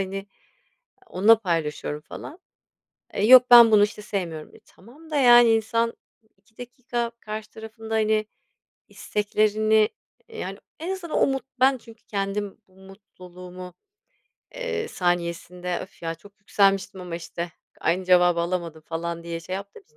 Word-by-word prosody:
hani, 195 +1 -4 0.8
onunla 220 - +4
paylaşıyorum 160 -6 -3
falan. 295 - -10 0.7
"E, 200 - -2
yok, 250 +2 +9
ben 235 -2 +10
bunu, 210 -1 +6
işte, 210 0 -2
sevmiyorum." 175 -7 -5
E, - - -16
tamam 275 - -19
da, 305 - -4
yani, 240 -4 +7
insan 230 +1 0 0.4
2 220 +3 -34
dakika 245 -1 -4
karşı 215 0 -7
tarafın 220 0 -11
da, 225 - -1
hani, 215 0 +1 0.6
isteklerini, 215 +1 +1 0.4
eee, 455 -1 -11
yani, - - -5 0.2
en 340 - -4
azından 345 -4 -5
o - - +4
mut 270 -1 -2 0.2
ben, 265 0 +4
çünkü 230 -1 -17
kendim 200 0 -3
bu 185 - -26
mutluluğumu, 180 -2 -12 0.8
eee, 465 -3 -3
saniyesinde, 175 - -2
"öf 190 - -12
ya, 165 0 -3
çok 200 +5 -19
yükselmiştim 195 -1 +1
ama, 175 -2 -6
işte, 170 0 -6 0.3
aynı 185 +3 0
cevabı 175 -1 +4
alamadım" 170 -2 -3
falan 170 +1 -4
diye 170 0 -5
şey 185 +3 -6
yaptığım 200 +1 -8
için 150 - -34
200 Hz, 145 wpm, -24 LUFS, 180-225 Hz, 0.8 s, ben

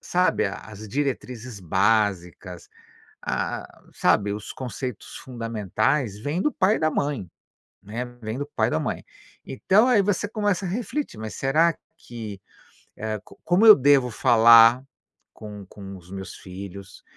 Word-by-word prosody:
sabe, 180 -10 +1
a 95 - -4
as 110 0 -10
diretrizes 125 -4 -4
básicas, 95 -2 0 0.5
ah - - -3
ah, - - -22
sabe, 100 -1 +2
os 105 0 -6
conceitos 125 -2 -6
fundamentais, 115 0 -2
vêm 150 +9 -2
do 300 - +1
pai 195 +3 +2
e - - -3
da 155 0 +1
mãe, 140 - -2 0.5
né, 110 +5 -5 0.2
vem 110 +3 -4
do 145 - -3
pai - - -1
e - - -3
da - - 0
mãe. - - -4 0.4
Então, 195 - +2
aí 230 -5 +4
você 205 0 -1
começa 205 -3 -1
a - - -3
refletir, 245 - -4
"mas 110 -1 -6
será 155 +5 +2 0.2
que", 110 -5 -9 0.6
hã, 110 0 -3
"co - - -18
como 175 +6 +3
eu 215 - +12
devo 135 -2 +3
falar 115 +1 +6 0.5
com 105 -2 -10
com 95 0 -10
os 90 0 -16
meus 95 -1 -7
filhos? 95 +1 -10
115 Hz, 155 wpm, -24 LUFS, 100-150 Hz, 0.6 s, eu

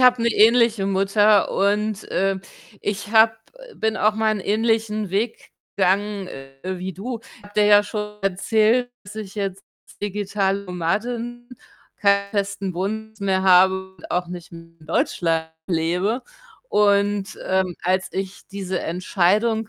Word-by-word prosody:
habe 250 -2 +5
'ne 235 - +3
ähnliche 230 -2 +4
Mutter 200 +2 +3
und, 210 +1 0
äh, 195 0 +1 0.4
ich 205 0 -3
habe 220 0 +7 0.2
äh, - - -14
bin 220 0 -1
auch 215 0 +2
mal 220 0 +1
'n 210 - -3
ähnlichen 215 -1 0
Weg 220 +4 -2 0.3
gegangen, 200 +1 +1
äh, 135 0 -10
wie 185 0 -4
du. 230 +6 -5 0.2
Ich 225 - -21
habe 205 0 -15
dir 210 - +4
ja 205 0 +7
schon 210 0 -5
erzählt, 220 +5 +2
dass 185 - -11
ich 215 -2 -7
jetzt 195 -1 -4 0.4
digitale 200 -1 -1
Nomadin, 235 +7 -3 0.5
keinen 200 -1 +2
festen 200 -2 -2
Wohnsitz 220 +3 -4
mehr 190 -1 +1
habe 190 0 +4
und - - -13
auch 180 0 0
nicht 175 -1 -9
mehr 165 0 -9 0.2
in 155 - -17
Deutschland 165 0 0 0.2
lebe 180 +7 0 0.5
und, 205 -1 +2
ähm, 190 -1 +1
als 185 +1 +1
ich 190 0 -5
diese 190 -2 -3
Entscheidung 205 +6 +1
200 Hz, 145 wpm, -22 LUFS, 190-215 Hz, 0.5 s, habe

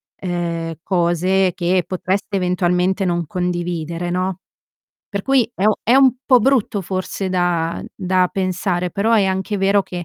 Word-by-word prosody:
ehm, 170 -3 -3
cose 180 +1 +1
che 180 0 +1
potreste 190 +2 -2
eventualmente 180 +1 +1
non 175 -2 -1
condividere, 175 -1 -3
no. 185 +1 -2 0.7
Per 200 -2 -4
cui 260 -2 +2
è 195 - -2
o 215 - +2
è 240 - +3
un 265 -1 +6
po' 255 -3 +5
brutto 235 -5 +1
forse 185 +1 -3
da 175 -2 0
da 185 -1 +1
pensare. 185 -1 -1
Però 215 +6 0
è 215 -3 +4
anche 190 +2 -1
vero 195 +1 +3
che 180 -2 -6
185 Hz, 150 wpm, -19 LUFS, 175-195 Hz, 0.7 s, un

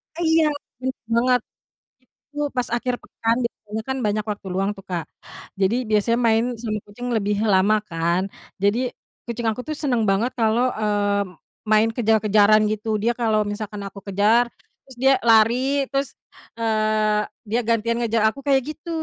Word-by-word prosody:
Iya, 325 -1 +3 0.4
bener 260 0 -2 0.2
banget. 250 0 +3 0.9
Itu 295 - -16 0.2
pas 245 - +1
akhir 250 +1 -1
pekan 225 +1 -1
biasanya 215 -1 -5
kan 265 - -1
banyak 210 0 0
waktu 205 -1 -7
luang 195 +2 0
tuh, 195 - -11
Kak. 170 -3 -2 0.6
Jadi 195 +4 +3
biasanya 215 +2 +2
main 225 +1 +3 0.2
sama 215 -3 -2
kucing 245 +4 -8
lebih 205 0 0 0.2
lama 195 +3 +4
kan, 170 +2 0 0.4
jadi 205 +4 +3 0.5
kucing 235 -1 -3
aku 220 +3 -3
tuh 310 - -3
seneng 245 -5 +1
banget 220 +6 +1
kalau, 230 +2 +3 0.2
eee, 205 -1 +1 0.5
main 215 +1 +5
kejar-kejaran 215 -2 +4
gitu, 215 +1 -4
dia 235 - +2
kalau 215 -2 +2
misalkan 210 -1 -5
aku 200 - -10
kejar 210 +5 +3 0.4
terus 265 -2 -13
dia 270 0 +6 0.2
lari, 225 +1 +6 0.3
terus, 275 0 -1 0.5
eee, 215 -1 +1 0.2
dia 235 +3 +1
gantian 230 0 +1
ngejar 230 -2 +1
aku 275 - -9
kayak 275 -1 +4
gitu, 310 +2 -8
220 Hz, 155 wpm, -22 LUFS, 210-240 Hz, 0.9 s, dia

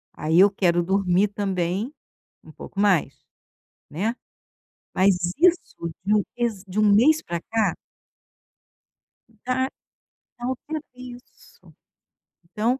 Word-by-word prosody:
Aí 160 +3 +2
eu 200 +1 +8
quero 175 -3 +2
dormir 190 +1 +2
também 195 +3 -2 0.5
um - - -14
pouco 195 - -9
mais, 200 -6 +2 0.8
né. 210 +10 -1 0.8
Mas 190 0 +4 0.2
isso, 335 - +1
de 210 - +2
um 205 - +2
mês 225 -5 -2
de 190 +3 -3
um 210 -1 +5
mês 300 +9 +5
para 170 0 -4
cá 225 -1 0 1.7
Da 260 +1 0 0.7
da 240 - -5
outra 295 +4 -4
isso. 250 0 -14 0.8
Então 230 +8 -1
205 Hz, 115 wpm, -24 LUFS, 185-245 Hz, 1.7 s, eu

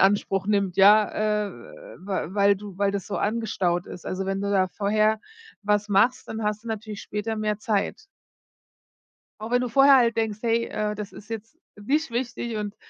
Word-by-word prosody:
Anspruch 195 -1 +2
nimmt, 200 -3 +1
ja, 210 +1 +4
äh, - - -7 0.5
we 190 -2 -3
weil 200 -1 +4
du 200 -2 -10
weil 200 -1 +2
das 200 -1 -4
so 200 - -3
angestaut 205 -5 -1
ist. 175 - -10
Also, 190 +1 -3
wenn 195 0 -1
du 200 - -2
da 190 -2 +3
vorher 215 +3 +1 0.4
was 210 0 +1
machst, 220 +6 +2
dann 220 0 -4
hast 210 +1 -2
du 235 - -7
natürlich 215 -1 -5
später 215 +2 -4
mehr 210 -1 -1
Zeit. 215 -3 -1 1.4
Auch 220 - -6
wenn 245 0 +3
du 250 - -1
vorher 275 +2 +6
halt 235 -3 +3
denkst: 220 -2 -1
„Hey, 230 0 +1
äh, 210 0 -2
das 210 -1 -7
ist 210 - -13
jetzt 225 +7 -7 0.2
nicht 280 +8 -1
wichtig 240 -1 -3
und 210 0 -4
210 Hz, 185 wpm, -25 LUFS, 200-225 Hz, 1.4 s, vorher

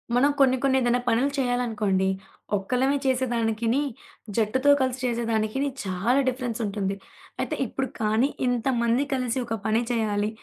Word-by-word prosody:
మనం 275 +4 +4
కొన్ని, 260 -1 +5
కొన్ని 265 -1 +3
ఏదైనా 245 0 +2
పనులు 245 +4 +3
చేయాలనుకోండి, 220 -7 +1 0.5
ఒక్కలమే 255 +8 +1
చేసేదానికిని, 240 -2 +1 0.5
జట్టుతో 245 +5 +2
కలిసి 260 -1 0
చేసేదానికిని 230 +2 0
చాలా 200 +7 +1
డిఫరెన్సుంటుంది. 225 -6 -2 0.5
అయితే - - -2
ఇప్పుడు 265 +3 -3
కానీ, 220 +3 +2 0.2
ఇంతమంది 245 0 +1
కలిసి 255 -2 -1
ఒక 225 -1 -2
పని 220 +1 +2
చేయాలి, 210 -3 0
240 Hz, 120 wpm, -25 LUFS, 220-260 Hz, 0.5 s, కొన్ని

